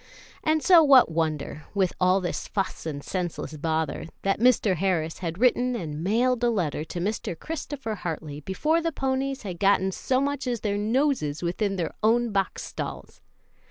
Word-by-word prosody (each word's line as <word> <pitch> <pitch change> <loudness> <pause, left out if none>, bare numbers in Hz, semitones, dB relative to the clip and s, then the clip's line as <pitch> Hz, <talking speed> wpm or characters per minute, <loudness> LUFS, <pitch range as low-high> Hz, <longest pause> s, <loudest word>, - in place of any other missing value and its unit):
And 310 0 +2
so 355 -3 +8
what 275 - +6
wonder, 155 -2 -2
with 190 -3 +2
all 185 +1 +4
this 175 - -3
fuss 195 -4 -3
and 145 -2 -5
senseless 175 -4 -4
bother, 160 0 -2 0.2
that 195 0 +1
Mr. 225 -6 +3
Harris 165 -3 0
had 170 -2 -4
written 250 +2 +2
and 160 -7 -4
mailed 240 +5 +2
a 240 - +4
letter 170 -9 -1
to 175 - -6
Mr. 190 -2 -2
Christopher 290 -7 -5
Hartley 160 -6 -5
before 300 - 0
the 330 0 -1
ponies 270 -1 -2
had 180 -4 -6
gotten 195 -1 +3
so 255 +7 0
much 280 -1 -1
as 240 -3 -1
their 205 -1 -1
noses 220 - 0
within 195 +4 -1
their 175 -3 -2
own 230 +2 +3
box 195 -1 -1
stalls! - - -7
195 Hz, 170 wpm, -26 LUFS, 170-250 Hz, 0.2 s, so